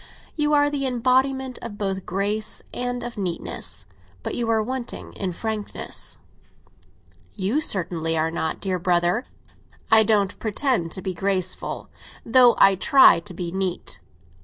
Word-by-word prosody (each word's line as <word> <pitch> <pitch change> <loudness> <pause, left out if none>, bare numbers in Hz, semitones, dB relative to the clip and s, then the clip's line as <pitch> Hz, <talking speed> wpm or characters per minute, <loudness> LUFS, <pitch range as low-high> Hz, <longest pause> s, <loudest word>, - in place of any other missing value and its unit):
You 300 -1 +1
are 290 0 +3
the 275 -2 -1
embodiment 260 +1 0 0.2
both 195 -2 -1
of 190 - -10
grace 205 +3 -1
and 245 0 -3
of 235 -2 -6
neatness; 180 - -3 0.4
but - - -4
you 235 -1 -1
are 220 -1 +2
wanting 255 +1 -6
in 190 -2 -3
frankness." 215 +3 -3 1.2
"You 215 +9 0
certainly 165 - +2
are 160 +1 0
not, 160 -1 -3
dear 185 -2 -2
brother." 175 +6 +1 0.7
"I 220 0 +8
don't 205 -2 +1
pretend 220 - 0
to 190 - -5
be 190 - -3
graceful, 185 0 -1 0.3
though 245 0 +6
I 195 - +6
try 265 - +6
to 180 +2 -9
be 175 -1 -4
neat. 190 -1 -2
205 Hz, 140 wpm, -23 LUFS, 185-245 Hz, 1.2 s, I